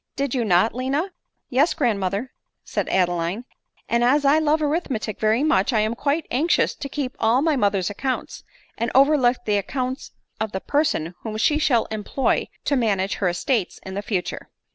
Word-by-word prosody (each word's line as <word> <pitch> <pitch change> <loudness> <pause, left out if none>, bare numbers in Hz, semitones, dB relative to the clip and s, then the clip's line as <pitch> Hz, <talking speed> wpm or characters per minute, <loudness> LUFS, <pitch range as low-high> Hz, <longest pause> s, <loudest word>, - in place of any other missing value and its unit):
Did 275 -2 -2
you 250 -3 +1
not, 195 +1 +3
Lina 275 +9 -1
?" - - -56
" - - -53
Yes, 290 +6 +2
grandmother," 215 - -1 0.3
said - - -3
Adeline; 175 +4 0 0.2
" - - -38
and 235 0 +1
as 280 +4 +3
I 290 +3 +5
love 310 0 +2
arithmetic 290 - -2
very 220 +5 +2
much, 310 -2 +2
I 220 -3 +2
am 215 +2 0
quite 285 +6 -1
anxious 305 +8 +2
to 275 - -7
keep 270 -2 -4
all 230 +5 +3
my 315 -2 +2
mother's 200 -5 +1
accounts, 260 +5 -4 0.4
and 235 +1 0
overlook 270 -3 +5
the 210 -1 +2
accounts 255 +5 -4 0.3
of 220 -1 -3
the 190 - -1
per 290 +9 +1
son 170 - -2
whom 215 -1 -5
she 295 +7 +2
shall 245 -7 +2
employ 220 +5 0 0.2
to 285 - +2
manage 200 -6 +1
her 185 - +1
estates 195 +3 -1
in 190 +1 -4
future." 195 -4 -3
245 Hz, 185 wpm, -23 LUFS, 205-280 Hz, 0.4 s, I